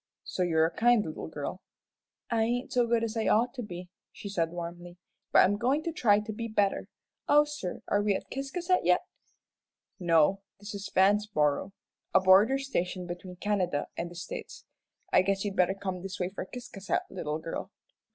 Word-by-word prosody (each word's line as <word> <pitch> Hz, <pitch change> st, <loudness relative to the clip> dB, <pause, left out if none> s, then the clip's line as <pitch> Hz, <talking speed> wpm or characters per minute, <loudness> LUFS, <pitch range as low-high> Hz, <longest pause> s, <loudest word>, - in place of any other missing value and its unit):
"So -, -, -4 dB
you're 160 Hz, -3 st, +3 dB
a 165 Hz, +1 st, -3 dB
kind 235 Hz, -2 st, +4 dB
little 155 Hz, -, -6 dB
girl." 160 Hz, +4 st, -5 dB, 0.7 s
"I 230 Hz, -1 st, +2 dB
ain't 240 Hz, +3 st, -1 dB
as 245 Hz, -1 st, +3 dB
good 230 Hz, -1 st, +2 dB
as 230 Hz, 0 st, -2 dB
I 225 Hz, -, 0 dB
ought 235 Hz, +3 st, +3 dB
to 260 Hz, -, -5 dB
be," 180 Hz, -4 st, -8 dB, 0.2 s
she 200 Hz, -, -8 dB
said, 170 Hz, -4 st, 0 dB
warmly; 175 Hz, +1 st, -7 dB, 0.3 s
"but -, -, +7 dB
I'm 205 Hz, +2 st, +1 dB
goin' 260 Hz, +7 st, +1 dB
to 335 Hz, -, -2 dB
try 220 Hz, -10 st, +4 dB
to 215 Hz, +1 st, -6 dB
be 230 Hz, +2 st, -4 dB
better. 205 Hz, -3 st, +1 dB, 0.4 s
Oh, 295 Hz, 0 st, +7 dB
sir, 295 Hz, -12 st, -6 dB
are 205 Hz, -, +2 dB
we 205 Hz, -1 st, +2 dB
at -, -, -4 dB
Ciscasset 340 Hz, +7 st, 0 dB
yet?" -, -, +4 dB, 1.0 s
"No, 170 Hz, +2 st, +3 dB, 0.2 s
this 205 Hz, 0 st, -8 dB
is 200 Hz, 0 st, -6 dB
Vanceboro, 190 Hz, -4 st, +3 dB, 0.4 s
the -, -, +9 dB
border 195 Hz, +8 st, +6 dB
station 185 Hz, -9 st, -2 dB
between 175 Hz, +1 st, -7 dB
Canada 180 Hz, -6 st, -1 dB
and 170 Hz, -, -3 dB
the 175 Hz, -, -12 dB
States. 175 Hz, -, -7 dB, 0.5 s
I -, -, +7 dB
guess 195 Hz, +1 st, 0 dB
you'd 200 Hz, -1 st, -2 dB
better 185 Hz, 0 st, +3 dB
come 190 Hz, -2 st, -4 dB
this 190 Hz, 0 st, -6 dB
way 180 Hz, -1 st, 0 dB
for 190 Hz, -, -5 dB
Ciscasset, 240 Hz, -5 st, -3 dB
little 155 Hz, -5 st, -3 dB
girl." 165 Hz, +4 st, -5 dB
195 Hz, 185 wpm, -29 LUFS, 175-230 Hz, 1.0 s, the